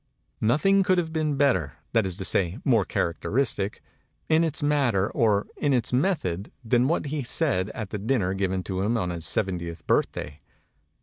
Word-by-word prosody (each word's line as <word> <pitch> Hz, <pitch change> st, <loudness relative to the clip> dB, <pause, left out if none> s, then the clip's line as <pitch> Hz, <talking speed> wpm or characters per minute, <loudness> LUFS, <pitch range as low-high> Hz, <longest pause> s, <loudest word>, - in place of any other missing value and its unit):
Nothing 155 Hz, -, +3 dB
could 185 Hz, -1 st, +2 dB
have 165 Hz, -2 st, -1 dB
been 155 Hz, -2 st, 0 dB
better 120 Hz, -, +2 dB, 0.2 s
that 115 Hz, -4 st, +3 dB
is 90 Hz, -1 st, -4 dB
to 95 Hz, -, -3 dB
say, 90 Hz, +1 st, 0 dB
more 115 Hz, -8 st, +3 dB
characteristic 105 Hz, +3 st, -1 dB, 0.5 s
in 160 Hz, +1 st, +4 dB
its 160 Hz, -1 st, -1 dB
matter 135 Hz, -9 st, +2 dB
or 105 Hz, -3 st, +2 dB
in 145 Hz, -2 st, +1 dB
its 125 Hz, 0 st, -1 dB
method 125 Hz, -, 0 dB
than 120 Hz, +2 st, +3 dB
what 160 Hz, 0 st, 0 dB
he 145 Hz, +1 st, -2 dB
said 120 Hz, -, 0 dB
at 110 Hz, -4 st, -5 dB
the 105 Hz, -, -3 dB
dinner 105 Hz, -4 st, 0 dB
given 95 Hz, -1 st, -1 dB
to 95 Hz, 0 st, -3 dB
him 110 Hz, +4 st, +1 dB
on 90 Hz, -5 st, -1 dB
his 85 Hz, -2 st, -3 dB
seventieth 85 Hz, -3 st, -2 dB
birthday. 70 Hz, -, -1 dB
110 Hz, 175 wpm, -26 LUFS, 95-145 Hz, 0.5 s, in